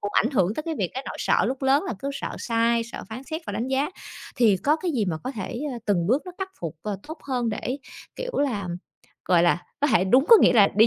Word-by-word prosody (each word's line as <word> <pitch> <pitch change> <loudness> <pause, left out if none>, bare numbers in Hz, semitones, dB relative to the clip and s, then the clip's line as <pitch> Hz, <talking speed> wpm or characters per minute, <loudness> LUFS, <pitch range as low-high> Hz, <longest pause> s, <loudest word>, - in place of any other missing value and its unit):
cũng 205 - -3
ảnh 235 - +3
hưởng 205 -5 +2
tới 310 - -3
cái 325 0 -3
việc 185 -4 -1
cái 265 - -3
nỗi - - -6
sợ - - +3
lúc 270 +1 -2
lớn 270 +2 +3
là - - -2
cứ 275 - -4
sợ - - -5
sai, 230 0 +1
sợ 235 - -8
phán 230 +4 -7
xét 315 +3 -4
và - - -4
đánh 240 +3 -2
giá. 270 +2 +1 0.5
Thì 220 -6 +5
có 295 - +2
cái 345 +1 -2
gì 235 -8 0
mà 170 -4 -1
có 260 - -2
thể, 230 +1 -5
a, 240 - -5
từng 175 -5 +2
bước 260 +7 +2
nó 365 - -7
khắc 385 -1 -3
phục, 165 -1 -5
à, 210 - -3 0.2
tốt 315 +1 -7
hơn 250 -4 -1
để, 245 +5 -3 0.4
kiểu - - -4
là, 215 -10 0 0.6
gọi 175 -2 +4
là, 175 0 +3 0.2
có 290 - +3
thể 220 -8 +3
đúng 255 +9 +4
có 460 - +11
nghĩa - - +6
là 210 -5 +6
đi 220 +2 +7
240 Hz, 270 wpm, -25 LUFS, 205-280 Hz, 0.6 s, có